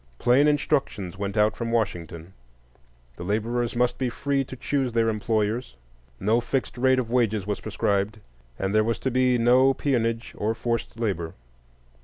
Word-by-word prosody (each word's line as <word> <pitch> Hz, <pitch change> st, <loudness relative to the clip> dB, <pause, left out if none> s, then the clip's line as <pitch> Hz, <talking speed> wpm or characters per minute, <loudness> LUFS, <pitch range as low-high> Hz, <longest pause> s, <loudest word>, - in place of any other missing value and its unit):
Plain 125 Hz, -, +4 dB
instructions 140 Hz, -, 0 dB
went 100 Hz, +1 st, -3 dB
out 105 Hz, +1 st, +3 dB
from 115 Hz, -1 st, -3 dB
Washington: 85 Hz, -6 st, -2 dB, 0.8 s
the -, -, -6 dB
laborers 115 Hz, +5 st, -1 dB
must 125 Hz, 0 st, +1 dB
be 130 Hz, -2 st, 0 dB
free 140 Hz, +2 st, -1 dB
to 130 Hz, -, -9 dB
choose 130 Hz, -1 st, -1 dB
their 115 Hz, -1 st, +2 dB
employers, 110 Hz, -, -1 dB, 0.4 s
no 110 Hz, +5 st, +2 dB
fixed 130 Hz, +2 st, -2 dB
rate 130 Hz, +1 st, +3 dB
of 120 Hz, -3 st, -2 dB
wages 110 Hz, -5 st, +1 dB
was 105 Hz, 0 st, -2 dB
prescribed, 105 Hz, 0 st, -1 dB, 0.4 s
and 95 Hz, +1 st, -2 dB
there 110 Hz, 0 st, +4 dB
was 115 Hz, -1 st, 0 dB
to 130 Hz, -, -2 dB
be 125 Hz, 0 st, +3 dB
no 130 Hz, +3 st, +4 dB
peonage 115 Hz, -4 st, -1 dB
or 110 Hz, +2 st, 0 dB
forced 115 Hz, -1 st, -3 dB
labor. 85 Hz, -8 st, -2 dB
115 Hz, 160 wpm, -25 LUFS, 105-125 Hz, 0.8 s, Plain